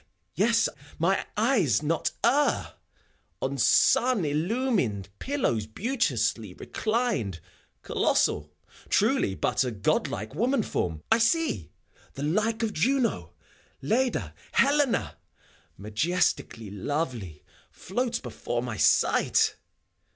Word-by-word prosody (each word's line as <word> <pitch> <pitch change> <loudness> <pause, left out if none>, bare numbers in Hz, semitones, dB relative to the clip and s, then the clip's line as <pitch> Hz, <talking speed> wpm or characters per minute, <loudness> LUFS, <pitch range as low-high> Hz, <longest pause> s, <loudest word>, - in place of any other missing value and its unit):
— - - -47
^Yes 230 +2 +3
I - - -7 0.3
mine 190 +4 +1
eyes 210 - +2
not 160 +2 0
err! 280 +5 +2 0.3
— - - -42
On - - -1
sun 245 -8 +4
illumined 155 - 0
pillows 120 - -1
beauteously 115 - -1
reclined, 215 - -2 0.4
Colossal, 75 0 +1 0.4
truly, 95 - +2
but - - +1
a 125 - -1
godlike 105 0 -1
woman 245 +1 +1
form, 80 - -3
I 230 - +5
see! 230 - +1 0.5
The 135 - -5
like 215 +9 0
of 215 -2 -1
Juno, 230 - 0 0.5
Leda, 245 - 0 0.2
Helena, 285 -2 +2 0.6
Majestically 110 - -1
lovely, 110 - -4 0.3
floats 240 +4 -2
before - - -4
my - - -4
sight! - - +3
175 Hz, 105 wpm, -27 LUFS, -, 0.6 s, I